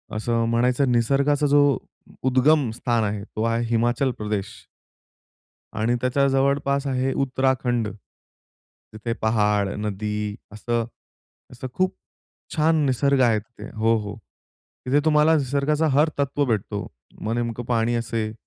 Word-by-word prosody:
असं 115 +1 0
म्हणायचं 125 +3 +2
निसर्गाचा 140 +5 +2
जो 145 0 +5 0.6
उद्गम 130 +1 +3
स्थान 120 -2 0
आहे 105 -1 -2
तो 110 +1 -5
आहे 115 +1 0
हिमाचल 120 +3 +1
प्रदेश. 105 -1 -4 1.1
आणि 120 +3 +1
त्याच्या 140 +2 +2
जवळपास 140 +1 +1
आहे 130 0 0
उत्तराखंड, 130 -3 0 1.1
तिथे 115 +2 -3
पहाड, 105 -2 +2
नदी 105 0 -3 0.2
असं 115 +1 -2 0.7
असं 130 +1 -7
खूप 185 +3 0 0.6
छान 155 -1 +3
निसर्ग 135 +1 +2
आहे 115 -3 +4
तिथे. 115 +3 -12
हो, 115 +1 +3
हो. 105 -1 -5 0.7
तिथे 140 +3 +3
तुम्हाला 155 +1 +4
निसर्गाचा 145 +3 0
हर 150 +4 +3
तत्व 140 0 +1
भेटतो. 105 -3 -2 0.3
मग 110 - -2
नेमकं 120 0 -3
पाणी 120 0 +1
असेल, 115 -2 -2
120 Hz, 125 wpm, -23 LUFS, 110-140 Hz, 1.1 s, जो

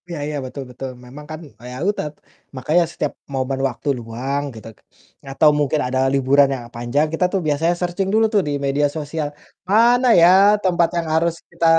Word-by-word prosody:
Iya 170 -3 -5
iya, 150 - -4
betul 135 +2 -7
betul. 125 +1 -7 0.2
Memang 140 +4 -11
kan 155 - -6 0.2
e - - -16
ya - - -8
udah, 205 - -2 0.5
makanya 155 +7 +2
setiap - - -3 0.2
momen 135 0 -2
waktu 130 +4 -10
luang, 125 +5 -3
gitu. 110 -1 -11 0.6
Atau 150 +3 +4
mungkin 145 +1 +1
ada 130 +1 -1
liburan 140 +1 +4
yang 130 -3 -5
panjang, 120 +6 0
kita 170 +3 +1
tuh 195 - +2
biasanya 155 +4 +1
searching 180 +2 -1
dulu 220 +1 +4
tuh 205 - +4
di - - -1
media 140 +1 +2
sosial, 150 0 -3 0.4
"Mana 240 +4 +4
ya 170 - +8 0.4
tempat 175 -3 +2
yang 170 -1 -2
harus 165 +1 +2 0.2
kita 170 -1 -3
150 Hz, 185 wpm, -20 LUFS, 135-170 Hz, 0.6 s, ya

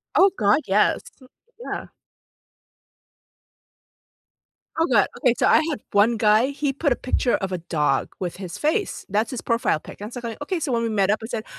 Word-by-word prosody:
Oh 390 +1 +6
god, 205 +9 +3
yes. 200 +2 +3 0.6
Yeah. - - -5 2.9
Oh 330 - +4
god, 210 -4 +4
okay, 245 -2 +3
so - - +2
I - - +6
had 285 - -3
one 215 +3 +3
guy, 215 +3 +4
he 280 0 -2
put 290 +1 0
a 245 - +3
picture 255 -1 0
of 195 -1 -3
a 185 - -1
dog 150 -5 0
with 180 -1 -4
his 185 0 -7
face. 315 - -1
That's 215 +5 0
his 255 - -4
profile 230 -9 0
pic, - - -13
and 210 +3 -7
so 245 - -5
I'm 235 - -3
like, 225 - -12
"okay," 335 +4 -2
so 285 -4 -2
when 230 -1 +1
we 230 - -1
met 200 -3 +1
up, 210 - +2
I - - -5
said, 225 -2 -4
225 Hz, 195 wpm, -23 LUFS, 200-265 Hz, 2.9 s, Oh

